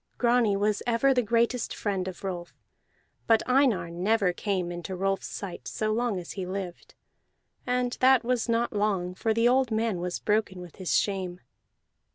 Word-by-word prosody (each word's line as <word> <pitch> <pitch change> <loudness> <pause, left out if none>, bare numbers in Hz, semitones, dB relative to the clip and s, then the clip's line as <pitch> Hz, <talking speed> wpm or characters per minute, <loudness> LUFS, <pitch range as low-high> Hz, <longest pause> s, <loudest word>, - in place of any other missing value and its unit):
Grani 235 -4 +3
was 205 +1 +1
ever 240 +3 +3
the 250 - +3
greatest 235 +1 0
friend 195 -3 -2
of 185 0 -7
Rolf, 175 -3 -5 0.7
but 225 -1 +4
Einar 250 -10 +2
never 190 +2 +1
came 185 -3 -2
into 175 +2 -5
Rolf's 195 +1 -1
sight 195 -3 -7
so 215 0 -1
long 230 -2 0
as 175 -2 -6
he 195 - -4
lived; 185 -1 -6 0.7
and 250 0 0
that 260 -1 +5
was 240 -1 0
not 230 +1 +1
long, 200 -4 0
for 220 +4 -1
the 230 +2 +3
old 260 0 +3
man 220 -4 0
was 180 0 -2
broken 210 -3 0
with 180 -2 -11
his 185 -2 +1
shame. 185 -3 -2
210 Hz, 170 wpm, -27 LUFS, 185-235 Hz, 0.7 s, that